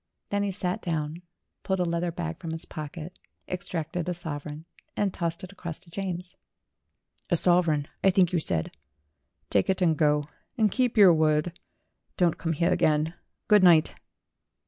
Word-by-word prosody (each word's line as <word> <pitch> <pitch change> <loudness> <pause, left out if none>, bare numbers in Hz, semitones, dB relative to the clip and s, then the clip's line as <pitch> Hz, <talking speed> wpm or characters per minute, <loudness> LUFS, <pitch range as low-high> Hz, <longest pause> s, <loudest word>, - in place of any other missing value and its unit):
Then 205 0 0
he 200 - 0
sat 185 -1 -2
down, 160 0 -3 0.4
pulled 190 -1 -1
a 180 - +2
leather 170 0 -1
bag 80 - -5
from 165 - -6
his 160 - -6
pocket, 155 +3 -8 0.3
extracted 175 -1 -3
a 180 - -2
sovereign, 150 -2 -6 0.3
and 200 -2 +1
tossed 170 0 -2
it 185 - -8
across 170 -5 -7
to 170 - -15
James. 180 -1 -5 0.9
"A 170 - +3
sovereign, 165 -5 +3 0.2
I 195 - +6
think 185 -2 +3
you 175 - +3
said. 80 - -1 0.8
Take 100 - +2
it 190 - +2
and 170 -4 +3
go. 150 -1 +2 0.3
And 215 -3 +3
keep 250 -2 0
your 195 -4 +8
word. 155 +1 +2 0.6
Don't 175 -3 +2
come 165 -1 -1
here 170 +3 +1
again. 155 +1 +2 0.3
Good 210 -1 +6
night." 165 -3 +6
170 Hz, 165 wpm, -27 LUFS, 155-180 Hz, 0.9 s, your